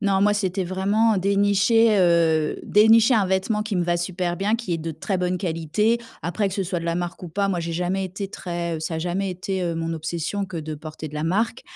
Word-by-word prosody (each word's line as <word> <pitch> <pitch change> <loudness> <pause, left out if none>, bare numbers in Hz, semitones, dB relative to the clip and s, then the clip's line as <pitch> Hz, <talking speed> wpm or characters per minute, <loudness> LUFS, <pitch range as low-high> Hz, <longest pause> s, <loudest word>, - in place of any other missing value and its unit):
Non, 200 -2 +2
moi 205 +1 +4
c'était 190 -2 -1
vraiment 200 +5 +2
dénicher, 205 +3 +3
heu, 165 -3 +3
dénicher 225 +4 +5
un 215 -3 +3
vêtement 190 +3 0
qui 215 -1 -4
me 180 - +1
va 175 0 +1
super 175 0 -2
bien, 200 +4 +1
qui 230 -7 -2
est - - -2
de 165 +1 -4
très 160 +5 -3
bonne 180 0 -1
qualité. 180 +6 0 0.2
Après, 175 +6 -1
que - - -7
ce 195 - -1
soit 180 0 -2
de - - -7
la 170 0 0
marque 175 +1 -4
ou 180 - -6
pas, 200 +4 0
moi 185 -3 0
j'ai 170 0 -3
jamais 180 +3 -1
été 195 +2 -5
très 170 -3 -4
ça 160 +1 -3
a - - -2
jamais 180 +4 -2
été, 185 +1 -3
heu, 170 -1 -1
mon 165 0 -2
obsession 165 +5 -3
que 180 -3 -6
de 155 0 -5
porter 155 +1 -8
de 150 - -11
la 150 - -3
marque. 220 +8 0
185 Hz, 240 wpm, -23 LUFS, 170-200 Hz, 0.2 s, dénicher